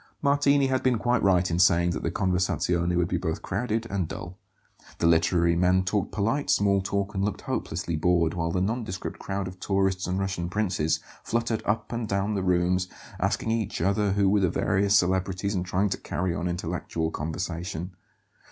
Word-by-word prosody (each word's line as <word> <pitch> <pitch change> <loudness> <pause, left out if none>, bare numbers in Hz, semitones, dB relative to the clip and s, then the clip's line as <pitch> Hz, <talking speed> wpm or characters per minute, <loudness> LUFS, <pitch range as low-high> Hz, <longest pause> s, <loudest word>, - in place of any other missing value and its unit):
Martini 140 0 +4
had 130 -1 +1
been 130 -2 +2
quite 120 +3 +1
right 90 -2 +3
in 85 - 0
saying 85 -1 +4
that - - -3
the - - -1
conversazione 90 -1 0
would 90 -1 +2
be 90 - -1
both 80 0 -3
crowded 110 +3 -1
and 95 -4 -1
dull. 90 +3 -8 0.6
The - - 0
literary 85 +1 +3
men 90 +2 +3
talked 100 +2 -1
polite 115 +8 -1
small 100 -1 +3
talk 100 +1 -2
and 95 -1 -1
looked 105 -1 -2
hopelessly 85 - -3
bored, 85 0 +2
while 85 -1 -1
the 90 - 0
"nondescript 105 -2 -3
crowd 95 -1 -3
of 90 0 -9
tourists 95 -1 0
and 90 +1 -1
Russian 95 -3 -2
princes" 95 -6 0 0.2
fluttered 115 -1 -1
up 105 +2 -1
and 115 -1 -2
down 100 +1 0
the 100 - -1
rooms, 90 0 +1 0.3
asking 110 - 0
each 115 -3 -1
other 100 +3 +1
who 100 -1 +2
were 100 +2 +4
the 95 -3 +2
various 100 +3 +2
celebrities 95 +1 0
and 90 -2 -2
trying 95 +3 +1
to - - -2
carry 90 -1 -2
on 85 - -2
intellectual 85 -2 -3
conversation. 85 +3 -4
95 Hz, 185 wpm, -26 LUFS, 90-100 Hz, 0.6 s, Martini